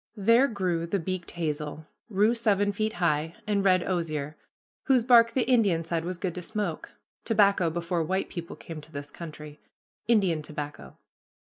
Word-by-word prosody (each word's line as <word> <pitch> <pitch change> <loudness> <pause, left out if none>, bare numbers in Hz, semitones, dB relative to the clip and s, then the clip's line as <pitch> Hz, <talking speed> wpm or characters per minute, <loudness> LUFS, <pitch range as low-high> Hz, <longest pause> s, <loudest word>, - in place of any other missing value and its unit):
There 230 +6 +5
grew 180 -7 -1
the 200 - 0
beaked 185 0 -4
hazel, 150 -2 -4 0.2
rue 210 +2 +3
seven 205 -3 +2
feet 215 +2 -1
high, 160 -4 0
and 205 -2 +1
red 185 -2 +4
osier, 155 -5 -2 0.5
whose 260 -4 +4
bark 230 -1 +6
the 255 - +2
Indian 210 -10 +3
said 165 0 -2
was 180 0 -4
good 180 -1 -3
to 180 - -5
smoke, 200 -3 -4 0.3
"tobacco 200 -5 +3
before 170 +1 -2
white 190 +4 -1
people 170 -1 -7
came 160 -2 -9
to 150 +1 -16
this 145 -1 -7
country, 150 -3 -9 0.5
Indian 195 -9 +3
tobacco." 150 - -7
175 Hz, 160 wpm, -27 LUFS, 160-205 Hz, 0.5 s, bark